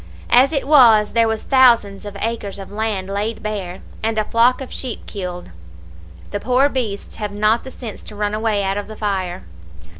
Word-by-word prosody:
As 260 +4 +6
it 280 -3 -1
was, 230 -8 +6
there 230 -1 +3
was 220 -1 -2
thousands 235 -7 +4
of 205 -1 -7
acres 220 -3 -3
of 195 -1 -9
land 205 -3 -2
laid 205 +3 -3
bare, 195 -4 -5 0.2
and 220 0 -1
a 215 - +1
flock 235 +3 +3
of 265 - -8
sheep 255 -3 -5
killed; 180 - -6 0.8
the 205 - -2
poor 255 +6 +2
beasts 225 -7 -4
have 210 -2 -4
not 215 +3 +1
the 265 - -8
sense 240 -4 -8
to 210 - -11
run 205 0 -2
away 215 -2 0
out 195 +1 -1
of 205 - -7
the 215 - -9
fire. 190 - -2
215 Hz, 190 wpm, -20 LUFS, 200-235 Hz, 0.8 s, As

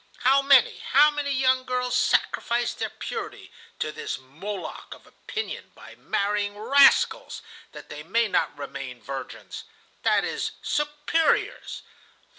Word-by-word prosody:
How 270 +2 +5
many, 275 -2 +5
how 295 +3 +5
many 290 -1 -3
young 260 -1 +2
girls 250 -1 -1
sacrifice 240 0 +1
their - - -3
purity 440 -2 -7 0.3
to 155 - -2
this - - -5
Moloch 165 +10 -7
of - - -20
opinion 435 -1 -7
by - - -13
marrying 205 0 -1
rascals 275 +6 +4 0.3
that - - -12
they 150 - -7
may 230 +9 +1
not 165 - 0
remain 135 -3 -7
virgins,—that 135 +2 -4
is, - - -3
superiors! 295 +2 0
245 Hz, 120 wpm, -25 LUFS, 180-280 Hz, 0.3 s, How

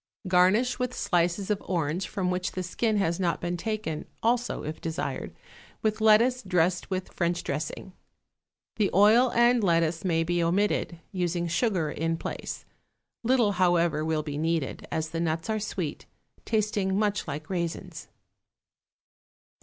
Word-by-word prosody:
Garnish 190 +8 +3
with 250 0 -2
slices 175 +2 0
of 205 - 0
orange 170 0 -1
from 185 -3 -1
which 180 0 -2
the 185 - -3
skin 215 +4 0
has 170 -3 0
not 175 -3 0
been 175 0 -2
taken, 205 -5 -3 0.2
also, 240 +2 +1
if 155 +1 -6
desired, 165 -1 -3 0.5
with 215 0 0
lettuce 230 +4 +5
dressed 180 -3 +1
with 185 -1 -3
French 175 0 -1
dressing. 150 +6 -4 0.8
The 210 -3 +2
oil 225 +5 +6
and 240 0 +4
lettuce 165 -1 +2
may 165 -3 +1
be 175 +1 0
omitted, 175 0 0
using 175 -2 -1
sugar 170 -3 0
in 165 +1 -1
place; - - -6 0.6
little, 240 -3 +3
however, 175 -4 +2
will 155 -1 0
be 145 -1 -4
needed, 160 -3 -1
as 160 0 -1
the 165 +1 -4
nuts 165 +3 -1
are 215 - 0
sweet, 180 -7 -4 0.4
tasting 210 -3 0
much 210 -2 0
like 150 +1 -5
raisins. 170 -3 -4
180 Hz, 145 wpm, -27 LUFS, 165-210 Hz, 0.8 s, oil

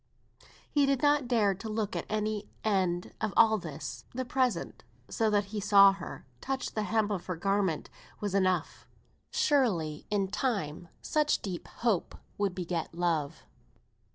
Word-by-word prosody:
He 285 -2 +2
did 275 0 +1
not 290 -3 +3
dare 220 -5 +3
to 195 +4 -7
look 215 -1 -1
to - - -5
any 215 -1 -1
end 185 -4 0
of 220 -2 -1
all 220 -1 +6
this; 135 -6 -7
the 255 0 -2
present, 250 -8 -1 0.3
so 220 -1 +1
that 205 -1 +2
he 210 - -1
saw 200 -1 +7
her, 195 -2 -8 0.2
touched 265 0 -3
the 215 - -1
hem 220 -1 +1
of 185 -3 -3
her 180 - -2
garment, 195 -2 0 0.3
was 205 -2 -3
enough. 185 -4 0 0.4
Surely, 185 - +1
in 200 -2 0
time, 195 - -2 0.2
such 300 -1 +1
deep 185 -4 -5 0.2
love 210 -8 +2 0.3
would 200 -3 0
beget 170 -3 -3
love. 165 -3 -1
200 Hz, 155 wpm, -30 LUFS, 175-220 Hz, 0.4 s, saw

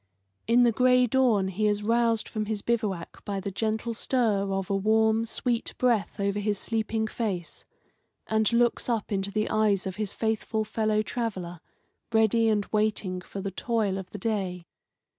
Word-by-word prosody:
In 240 +2 +5
the 240 - +5
gray 250 +2 +4
dawn 235 -6 +2
he 210 +3 0
is 210 0 0
roused 230 0 +2
from 215 -1 -3
his 210 -2 -2
bivouac 210 -7 -2
by 200 -1 -3
the 195 +1 -4
gentle 220 +3 -2
stir 215 -5 +1
of 195 -1 -2
a - - +2
warm, 220 +2 +3
sweet 235 +1 -2
breath 235 -6 +1
over 200 +1 0
his 205 0 0
sleeping 220 0 -1
face, 205 -6 -4 0.6
and 220 0 +1
looks 240 +1 +2
up 225 -3 -1
into 195 0 -1
the 215 +1 -1
eyes 210 -3 +2
of 190 0 -4
his 210 -2 -2
faithful 220 0 -1
fellow 215 0 0
traveller, 190 -8 -4 0.5
ready 225 0 +3
and 205 -2 +1
waiting 210 -4 0
for 195 +1 -7
the 195 0 -3
toil 210 -2 -1
of 185 -1 -8
the 205 - -7
day. 190 -4 -2
215 Hz, 170 wpm, -27 LUFS, 200-225 Hz, 0.6 s, In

